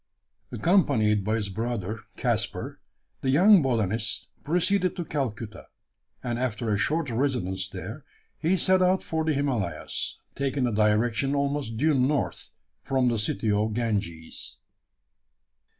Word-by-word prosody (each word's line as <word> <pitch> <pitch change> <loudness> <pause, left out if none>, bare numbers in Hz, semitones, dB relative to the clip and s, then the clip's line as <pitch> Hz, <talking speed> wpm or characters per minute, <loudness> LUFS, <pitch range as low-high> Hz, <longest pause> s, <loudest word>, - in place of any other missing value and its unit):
Accompanied 110 - +3
by 110 +3 0
his 105 -3 -2
brother, 110 0 -3 0.2
Caspar, - - -1 0.4
the 130 - 0
young 185 +7 +7
botanist 110 -4 0
proceeded 180 +3 +1
to 175 - -4
Calcutta; 115 -8 -4 0.6
and, 120 -2 -2
after 115 -3 -1
a 105 - +2
short 150 +3 0
residence 110 -7 -1
there, - - -7 0.4
he 180 +4 +2
set 185 +1 +4
out 185 +1 +3
for 160 0 -1
the 155 -1 +1
Himalayas 115 - -2 0.2
taking 135 -1 0
a 120 - 0
direction 110 +6 +2
almost 140 -5 -1
due 155 +5 +3
north 135 +2 0 0.3
from 130 -2 +1
the 115 -2 0
city 105 +1 0
of 105 +1 +1
the - - 0
Ganges. 100 -8 -3
120 Hz, 135 wpm, -26 LUFS, 105-145 Hz, 0.6 s, young